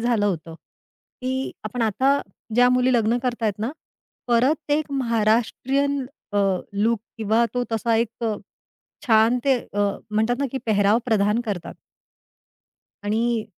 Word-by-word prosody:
झालं 230 -3 +2
होतं, 165 -3 -3 0.7
की 260 +1 -2
आपण 235 +3 -3
आता 265 +6 +2 0.3
ज्या 245 +1 +6
मुली 250 +1 +3
लग्न 230 0 +2
करतायेत 230 -5 -1
ना, 225 +5 -2 0.6
परत 280 +6 +2
एक 295 -1 0
महाराष्ट्रीयन 255 +3 +1 0.3
अ, 205 - +1 0.3
लूक 215 +3 +1 0.2
किंवा 220 +2 +2
तो 245 - +1
तसा 225 +1 +1
एक 230 +1 -2 0.8
छान 225 +2 +4
ते 275 - +4
अ, 205 - -8 0.3
म्हणतात 220 +3 +1
ना 280 - 0
की 265 - -1
पेहराव 205 0 +3
प्रधान 210 0 +2
करतात. 180 -5 -4 1.3
आणि 225 +2 0
230 Hz, 130 wpm, -23 LUFS, 215-255 Hz, 1.3 s, ज्या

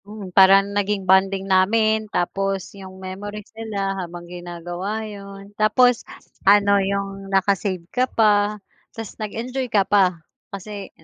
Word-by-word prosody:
Hmm, 205 -3 -9
parang 195 +1 +7
naging 205 -1 -1
bonding 190 +1 +3
namin. 215 +3 +2
Tapos 195 +1 -2
yung 190 -1 -11
memories 200 +3 -8
nila 210 -3 -3
habang 175 0 -8
ginagawa 175 +4 -6
yun. 200 -1 -10
Tapos 225 +3 +3 0.4
ano, 200 0 +4
yung 195 0 -3
naka-save 195 -2 0
ka 255 0 +1
pa. 210 -1 +2 0.4
Tapos 225 -3 -7
nag-enjoy 245 +5 -4
ka 205 -4 +2
pa 185 -4 +3 0.3
kasi 200 0 -8
200 Hz, 125 wpm, -22 LUFS, 190-210 Hz, 0.4 s, parang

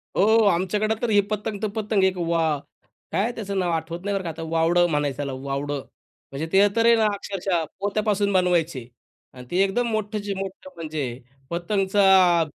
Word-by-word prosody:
हो, 220 +3 +4
आमच्याकडं 205 +5 +1
तर 240 - 0
ही 205 -1 +5
पतंग 210 0 -3
तर 215 - 0
पतंग, 210 -2 0
एक 190 -1 +2
वा 165 -3 +1 0.5
काय - - +1
आहे 235 - 0
त्याचं 200 -3 -4
नाव 175 -2 0
आठवत 165 +1 -3
नाही 200 - -1
बरं 190 - -2
का 170 - -4
आता. 165 +1 -6
वावडं 170 +2 +3
म्हणायचं 145 -3 -1
त्याला, 140 -2 -3 0.2
वावडं. 140 +1 -2 0.5
म्हणजे 150 +4 -4
ते 200 +1 +6
तर 230 0 +3
आहे 235 0 +7
ना, 220 -1 +2
अक्षरशः 195 -4 -2 0.2
पोत्यापासून 205 0 0
बनवायचे 170 -9 +1 0.5
आणि 125 -1 -11
ते 180 - 0
एकदम 235 +5 0
मोठचे 210 -1 -2
मोठं 190 -1 -7
म्हणजे 155 -3 -4 0.5
पतंगचा 190 -1 +3
190 Hz, 175 wpm, -24 LUFS, 165-205 Hz, 0.5 s, आहे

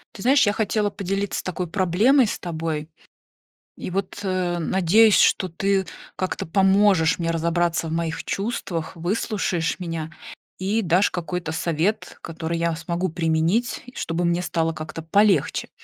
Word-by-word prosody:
Ты 195 - -9
знаешь, 275 0 +5
я 205 - +2
хотела 210 -1 0
поделиться 195 0 -3
такой 180 -1 -3
проблемой 205 - +3
с - - -3
тобой 160 -3 -4 0.9
и, - - -6
вот, 195 +1 -3
э, 185 -2 -1
надеюсь, 190 +5 +4
что 185 - +3
ты 195 +3 0 0.3
как-то 185 -3 -3
поможешь 190 -2 +3
мне 165 -1 -1
разобраться 170 0 0
в - - -5
моих 165 -1 -2
чувствах, 195 -6 -3
выслушаешь 175 -1 -1
меня 165 -3 -4 0.5
и 200 +4 0
дашь 185 +1 +2
какой-то 175 -1 -4
совет, 170 +6 -1
который 165 0 -4
я 170 0 0
смогу 170 +3 -2
применить, 165 +8 0
чтобы 170 -4 -2
мне 170 +1 +1
стало 165 -2 -1
как-то 160 +1 -7
полегче. 195 -1 +2
175 Hz, 140 wpm, -23 LUFS, 165-195 Hz, 0.9 s, знаешь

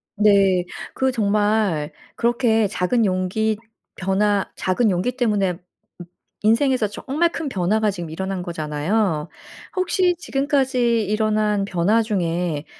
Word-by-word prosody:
네. 195 -3 +4 0.3
그 265 0 +1
정말 205 -7 +1 0.2
그렇게 235 -2 +2
작은 210 +4 +1
용기 195 +3 0 0.4
변화 195 +2 +1
작은 210 +5 +1
용기 210 +8 -1
때문에 210 -7 +1
음 175 0 -16 0.4
인생에서 230 +1 +2
정말 300 +11 -1
큰 315 -4 -4
변화가 210 +2 +1
지금 175 -5 -5
일어난 190 +3 -4
거잖아요. 160 +1 -1 0.5
혹시 370 -1 +1
지금까지 265 -7 +1
일어난 210 -1 +1
변화 200 +4 +2
중에 175 -7 -2
210 Hz, 250 characters per minute, -21 LUFS, 185-230 Hz, 0.5 s, 네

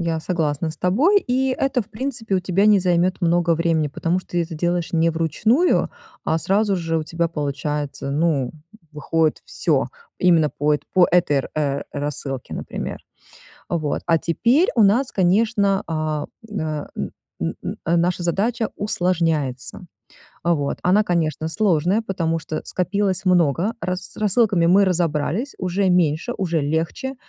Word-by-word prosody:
Я 165 -2 -1
согласна 160 -2 -1
с - - -7
тобой, 295 - +3
и 260 +1 +1
это, 265 -3 +1
в - - -21
принципе, 230 -4 -2
у - - 0
тебя 190 +2 +1
не 210 -1 +6
займет 180 +1 +1
много 170 0 +2
времени, 165 -2 +1
потому 170 +5 -1
что - - -23
ты 170 - +3
это 165 0 -6
делаешь 175 +2 -1
не 165 0 +3
вручную, 215 - +2 0.3
а 160 - +1
сразу 200 +4 +1
же 165 -2 -1
у - - -2
тебя 170 +1 -1
получается, 145 -2 -3
ну, 145 -5 +1 0.4
выходит 155 +1 0
всё - - 0 0.3
именно 165 -4 +4
по 150 +1 +1
это - - -4
по 185 -2 +5
этой, 150 -6 +2
э, 140 -2 0
рассылке, 140 -2 -3
например. - - -5 0.7
Вот, 155 -4 -1
а 165 -1 +3
теперь 240 - +2
у 225 - +5
нас, 235 +7 +3
конечно, 200 +1 +2
э, 155 -2 -2 0.3
м, 205 - -3
э, 155 -2 -3 0.5
н - - -2
н - - -4 0.2
наша 175 0 0
задача 220 +6 0
усложняется. 165 -8 -1 0.6
Вот, 160 -5 0
она, 195 +4 +4
конечно, 160 -4 -1
сложная, 180 +2 +2
потому 165 -6 -1
что 155 -1 -5
скопилось 190 +1 -1
много, 175 - +2
рассы 185 0 -4
с - - -9
рассылками 205 -4 +3
мы 195 +3 +5
разобрались, 175 - -1
уже 185 +1 0
меньше, 175 +4 +2
уже 170 -5 0
легче, 160 - -2
175 Hz, 150 wpm, -21 LUFS, 155-195 Hz, 0.7 s, не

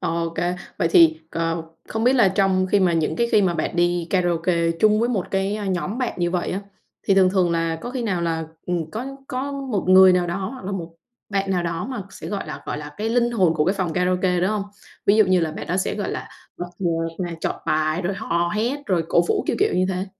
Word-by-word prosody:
OK, 165 0 -2 0.4
vậy 165 - +2
thì, 160 -1 +6
ờ, 165 0 -1 0.3
không 220 +1 -2
biết 250 - +5
là 230 -7 +5
trong 190 -1 +2
khi 200 +1 +2
mà 180 -2 +3
những 165 -2 0
cái 235 0 +1
khi 210 - +5
mà 180 -3 +1
bạn 160 +2 -2
đi 175 -1 +1
karaoke 170 -2 +1
chung 215 0 +4
với 240 - +1
một 205 -7 -1
cái, 195 +2 0
ơ, 210 - -5
nhóm 190 +4 -2
bạn 250 -2 -1
như 175 0 +1
vậy 180 -1 -1
á, 190 - -2 0.5
thì 195 - +4
thường 185 -1 +5
thường 185 -3 +2
là 165 -1 0
có 240 - -5
khi 255 -1 -3
nào 185 -7 -1
là, 160 -1 -1 0.2
ừm, 170 -3 -2
có 235 +4 -4 0.2
có 270 +2 -3
một 265 -8 -3
người 185 0 +8
nào 180 -1 +2
đó 175 +2 -2 0.2
hoặc 260 -7 -10
là 200 - -4
một 170 -3 -5 0.3
bạn 195 -1 -1
nào 180 -2 +1
đó 170 +3 -3
mà 240 -6 -4
sẽ, - - -8
gọi 205 - -4
là, - - -7
gọi 145 - -3
là 145 0 -9
cái 220 +2 -1
linh 240 0 +2
hồn 185 -8 +2
của 150 -1 +1
cái 185 - +2
phòng 185 -4 -2
karaoke, 180 +1 +1
đúng 190 +3 +1
hông? 210 -2 -1 0.4
Ví 200 - +5
dụ 215 - +6
như 185 -2 +3
là 160 -2 -1
bạn - - -7
đó 180 - -1
sẽ, 190 - -1
gọi 205 - -3
là, - - -5 0.3
bật 175 0 -6
nhạc 165 -3 0 0.2
này, 170 -1 -6
chọn - - -3
bài, 155 +3 +1
rồi 190 +2 -1
hò 175 -4 -1
hét, 245 +7 -1
rồi 175 -4 +1
cổ 170 - +4
vũ, - - +1
kiểu, - - 0
kiểu - - +2
như 185 +1 +2
thế. 190 0 -2
185 Hz, 260 wpm, -22 LUFS, 170-205 Hz, 0.5 s, người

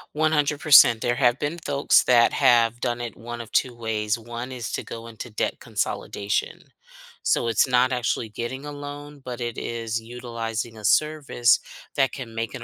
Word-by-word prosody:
100% 150 -5 +5
there 120 0 +1
have 120 -2 +3
been 150 +4 -2
folks 140 -4 +2
that 120 -2 +5
have 120 -3 +3
done 120 -1 -2
it 120 -1 -6
one 120 +1 -7
of 115 - -11
two 125 -2 +1
ways, 110 -1 -1
one 120 +2 -7
is 125 -3 -5
to - - -2
go 115 0 -8
into 115 +1 -8
debt 110 - -2
consolidation. 100 0 -2 0.6
So, 120 - +1
it's 115 +4 +3
not 125 0 +3
actually 120 -2 -1
getting 120 +6 -5
a 150 - -6
loan, 145 0 -9
but 125 -1 -6
it 120 -1 -4
is 115 -1 -3
utilizing 115 -1 -5
a 105 - -8
service 150 -2 +3 0.4
that 135 -2 +2
can 120 -5 -7
make 115 0 -3
an 125 - -7
120 Hz, 175 wpm, -24 LUFS, 115-135 Hz, 0.6 s, 100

